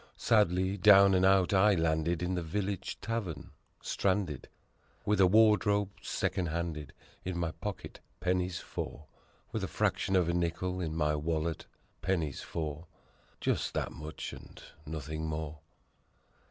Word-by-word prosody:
Sadly 95 -2 +2
down 100 0 +7
and 95 0 +3
out 95 -1 +4
I 100 +1 +5
landed 80 +1 +1
in 90 +1 -1
the 90 - -1
village 95 +3 -3
tavern 100 -10 -4 0.3
stranded! 95 -8 -1 0.6
With 105 -1 +3
a 95 - +7
wardrobe 105 -1 +4
second 90 -2 -1
handed; 80 -3 -3 0.3
in 90 -1 -3
my 85 -2 -1
pocket, - - -6 0.2
pennies 90 +1 0
four; 75 - -6 0.5
With - - -2
a - - -1
fraction 95 - 0
of 90 -3 +3
a 85 - +1
nickel 90 +2 -1
in 80 -2 -3
my 75 -1 +1
wallet 80 +2 -2 0.3
pennies 85 -7 -1
four 80 0 -5 0.5
Just - - -1
that - - -1
much 75 +1 -7
and - - -12 0.2
nothing 80 +1 -4
more. 80 -1 -4
90 Hz, 140 wpm, -31 LUFS, 80-95 Hz, 0.6 s, down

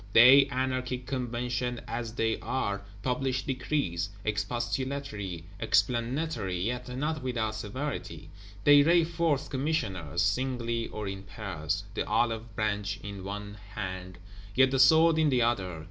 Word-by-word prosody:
They, 130 +4 +9
anarchic 130 -1 -2
Convention 125 -1 -2
as 115 -1 -4
they 115 -1 0
are, 105 -4 -2 0.2
publish 130 0 0
Decrees, 125 - -1 0.2
expostulatory, 120 -3 -2 0.2
explanatory, 115 - 0
yet 125 +6 -2
not 150 +2 -1
without 115 -4 -1
severity: 120 +8 -5 0.3
they 145 0 +8
ray 170 +3 +5
forth 160 -3 0
Commissioners, 100 - -1
singly 115 +1 0
or 105 -1 -5
in 95 0 -5
pairs, 95 -3 -4
the - - -1
olive 115 -2 0
branch 100 -1 -1
in 100 -2 -7
one 100 +1 -6 0.2
hand, 95 -3 -5 0.4
yet 130 0 +5
the 135 - +1
sword 160 +4 +6
in 155 -1 +4
the 125 -3 +3
other. 95 -8 0
120 Hz, 130 wpm, -29 LUFS, 100-130 Hz, 0.4 s, They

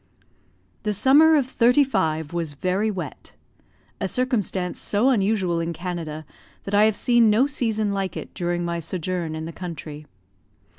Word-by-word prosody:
The 210 -1 -2
summer 295 +9 +6
of 285 -4 +3
'35 235 - +1
was 165 -3 -2
very 185 +7 0
wet; 180 -9 -7 0.7
a 195 - -1
circumstance 205 -6 -1
so 215 +6 +1
unusual 195 -6 +1
in 165 0 -2
Canada 165 -2 -5 0.4
that 200 - -6
I 205 +1 +6
have 220 -1 +2
seen 240 -1 +4
no 220 +5 +4
season 220 -7 -1
like 195 -1 -3
it - - -8
during 175 -1 -2
my 170 0 -2
sojourn 170 -1 -3
in 160 0 -5
the 165 - -7
country. 155 -4 -8
190 Hz, 150 wpm, -23 LUFS, 170-220 Hz, 0.7 s, summer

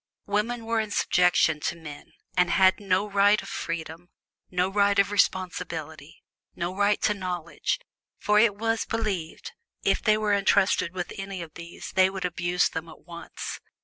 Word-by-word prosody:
Women 225 +3 -1
were 230 0 0
in 215 -1 -2
subjection 180 -5 +3
to 150 - -2
men, 155 -3 -11 0.2
and 180 -1 +3
had 190 0 +4
no 195 0 +1
right 205 +1 +4
of - - -8
freedom, 165 +1 -5 0.4
no 180 0 +1
right 200 +1 +2
to 200 - +7
responsibility, 170 -6 -2 0.3
no 175 +1 -3
right 205 +1 +2
to 210 - +3
knowledge, 180 -4 -3 0.4
for, 210 0 +3
it 215 -2 +4
was 225 +1 0
believed, 200 -8 -3 0.3
if - - +2
they 215 -1 +3
were 210 -1 +1
entrusted 195 -2 +2
with 180 -1 -4
any 195 -2 -5
of 160 - -12
these 170 0 -9
they 190 0 +4
would 190 -1 -4
abuse 180 0 +1
them 160 +1 -6
at - - -14
once. 170 -1 -7
190 Hz, 165 wpm, -26 LUFS, 170-205 Hz, 0.4 s, to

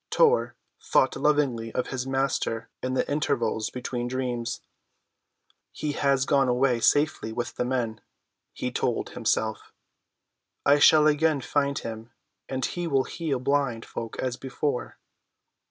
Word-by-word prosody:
Tor 485 0 +3 0.3
thought - - +2
lovingly 135 -7 +1
of 125 - -2
his 130 -1 -3
Master 135 -4 -1
in 130 0 -2
the - - +1
intervals 120 -7 0
between 120 -1 -4
dreams. 125 -2 -3 1.1
"He 150 - -3
has 140 -2 +1
gone 140 -2 +3
away 125 0 +2
safely 145 -2 +2
with 120 +2 -3
the 125 - -1
men," 120 -4 -2 0.5
he - - -4
told - - -1
himself. 110 -1 -1 0.9
"I 145 +1 +5
shall 150 +1 +7
again 155 0 +3
find 140 +1 0
him, 115 0 -6 0.4
and 130 -1 -1
he 175 -1 -3
will 135 -4 +2
heal 155 -5 -3
blind 130 -3 0
folk 115 -1 -6
as 125 -2 -2
before." 135 0 -3
130 Hz, 135 wpm, -26 LUFS, 120-145 Hz, 1.1 s, shall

